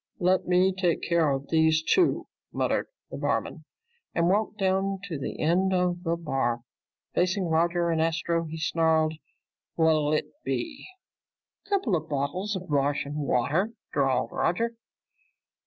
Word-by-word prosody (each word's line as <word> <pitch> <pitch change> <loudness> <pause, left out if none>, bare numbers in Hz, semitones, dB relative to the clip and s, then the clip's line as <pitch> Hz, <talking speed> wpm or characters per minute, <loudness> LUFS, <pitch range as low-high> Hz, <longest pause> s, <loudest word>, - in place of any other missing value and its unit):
"Let 185 +1 +2
me 185 +1 +4
take 180 -3 0
care 170 -3 +2
of 135 0 -2
these 160 -1 +3
two," 360 - +2 0.3
muttered - - 0 0.2
the - - -5
bartender - - -1 0.6
and 170 +1 +3
walked 210 +2 +1
down 195 0 +1
to 170 -8 -5
the - - -5
end 185 +4 +2
of 180 -1 0
the 170 -2 0
bar. 135 -7 -1 0.5
Facing 185 +2 +1
Roger 170 +1 +1
and 160 -1 +1
Astro, 165 +1 0
he 160 0 -6
snarled, 160 0 +2 0.6
"What'll 155 -2 +3
it 155 - 0
be?" 310 -5 -3 0.8
"Coupla 270 - +1
bottles 150 +9 -2
of 185 -1 -6
Martian 145 0 0
water," 150 - 0 0.2
drawled 135 -3 +1
Roger. 230 +7 0
170 Hz, 135 wpm, -27 LUFS, 155-185 Hz, 0.8 s, me